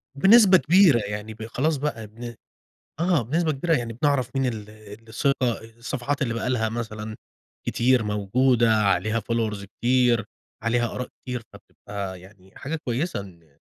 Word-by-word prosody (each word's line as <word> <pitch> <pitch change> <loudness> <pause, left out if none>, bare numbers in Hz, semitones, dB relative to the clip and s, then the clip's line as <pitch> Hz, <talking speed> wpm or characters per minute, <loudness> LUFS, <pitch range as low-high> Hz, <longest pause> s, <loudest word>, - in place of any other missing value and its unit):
بنسبة 195 +4 +7
كبيرة 175 -6 +5
يعني 105 +2 -5
ب 110 +1 -8
خلاص 145 +7 0
بقى 130 -6 -3
بن 115 +2 -9 0.7
آه، 170 -5 +2
بنسبة 155 +7 0
كبيرة 165 +4 0
يعني 120 -1 -3
بنعرَف 135 +1 0
مين 135 -1 +2
ال 110 -4 -4
اللي 110 +1 -13
ثقة، 130 -1 0 0.2
الصفحات 135 +4 -2
اللي 115 -4 -1
بقى 120 +2 -2
لها 110 -3 +1
مثلًا 110 -1 -5 0.5
كتير 125 0 +3
موجودة، 115 +3 +2
عليها 105 +1 +2
followers 110 -2 -2
كتير، 120 +2 +2 0.4
عليها 120 0 0
آراء 125 - -4
كتير 125 -2 -4
فبتبقى 100 -3 -8
يعني 95 0 -18
حاجة 160 +4 -3
كويسة 130 - -1
إن 85 -7 -14
115 Hz, 150 wpm, -24 LUFS, 105-135 Hz, 0.7 s, بنسبة